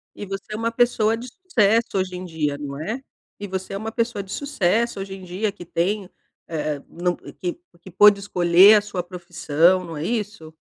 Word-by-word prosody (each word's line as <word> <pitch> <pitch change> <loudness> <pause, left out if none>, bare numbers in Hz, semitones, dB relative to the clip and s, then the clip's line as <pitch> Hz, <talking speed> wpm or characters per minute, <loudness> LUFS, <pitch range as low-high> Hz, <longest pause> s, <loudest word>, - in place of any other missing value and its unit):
E 205 - -6
você 195 +2 -7
é - - -2
uma 230 +1 -1
pessoa 230 -2 +2
de 235 +2 -8
sucesso 230 - +1
hoje 185 -1 -2
em 180 - -6
dia, 155 -4 -2
não 145 0 -6
é 220 +10 -4 0.4
E 205 - -5
você 190 0 -5
é - - -2
uma 220 +3 -4
pessoa 230 -3 -1
de 190 - -13
sucesso 235 -5 0
hoje 195 0 -6
em 190 -1 -10
dia 190 +4 -2
que 195 -3 -11
tem, 185 +4 -1 0.4
eh, 150 -3 -3
não 175 +1 -1
que 180 - -6 0.2
que 185 - -12
pode 200 +3 +6
escolher 185 +1 +6
a 210 - +5
sua 205 -3 -4
profissão, 175 0 +1
não 165 -2 -7
é 150 - -4
isso? 210 -7 -4
190 Hz, 200 wpm, -23 LUFS, 175-215 Hz, 0.4 s, pode